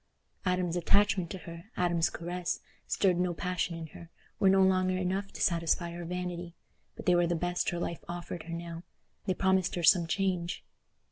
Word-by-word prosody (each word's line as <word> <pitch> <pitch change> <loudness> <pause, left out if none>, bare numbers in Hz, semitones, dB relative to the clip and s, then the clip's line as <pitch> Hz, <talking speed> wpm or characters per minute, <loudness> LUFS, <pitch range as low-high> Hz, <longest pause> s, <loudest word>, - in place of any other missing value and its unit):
Adam's 180 -2 +1
attachment 190 0 +3
to 190 - -5
her, 170 -1 -9
Adam's 175 -2 +2
caress, 175 +1 -3 0.3
stirred 185 -3 +2
no 180 -1 +1
passion 180 -1 -1
in 165 - -5
her, 170 - -11 0.3
were 195 - +5
no 190 0 +6
longer 185 -1 +3
enough 190 +2 -1
to - - -3
satisfy 170 -1 +1
her 170 0 -6
vanity, 175 0 -4 0.4
but - - -9
they 180 - +5
were 175 0 +4
the 175 - +1
best 175 +1 0
her 175 - -3
life 170 -1 -3
offered 175 0 -5
her 165 +1 -7
now—they 170 +2 -6
promised 190 -1 +2
her 175 - -2
some 170 0 +6
change. 180 -1 -1
175 Hz, 180 wpm, -31 LUFS, 170-185 Hz, 0.4 s, no